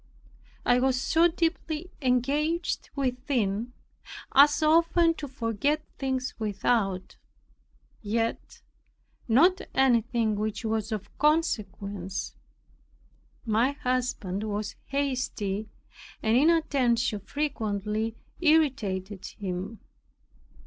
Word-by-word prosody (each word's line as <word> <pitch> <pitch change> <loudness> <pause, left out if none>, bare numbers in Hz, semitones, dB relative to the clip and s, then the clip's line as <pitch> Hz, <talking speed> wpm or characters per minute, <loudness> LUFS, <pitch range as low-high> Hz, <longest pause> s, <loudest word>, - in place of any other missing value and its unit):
I 245 - +4
was 260 0 +2
so 325 +5 +4
deeply 330 0 -2
engaged 285 +7 0
within, 250 -4 -1 0.6
as 290 +3 +6
often 330 +2 +4
to 300 -3 -7
forget 265 +4 -1 0.2
things 260 -2 -2
without, 200 -2 -1 0.8
yet 225 +2 -2 0.6
not 335 +11 +4
anything 235 -4 +2
which 215 +1 -3
was 220 0 -1
of 210 -2 -5
consequence. 205 - -1 1.1
My 230 +5 +2
husband 250 -8 -2
was 210 -1 -3
hasty, 255 -7 -2 0.5
and 220 +1 +3
inattention 260 -7 +2
frequently 220 -4 -2 0.3
irritated 220 - +1
him. 195 +2 -5
245 Hz, 80 wpm, -27 LUFS, 210-290 Hz, 1.1 s, as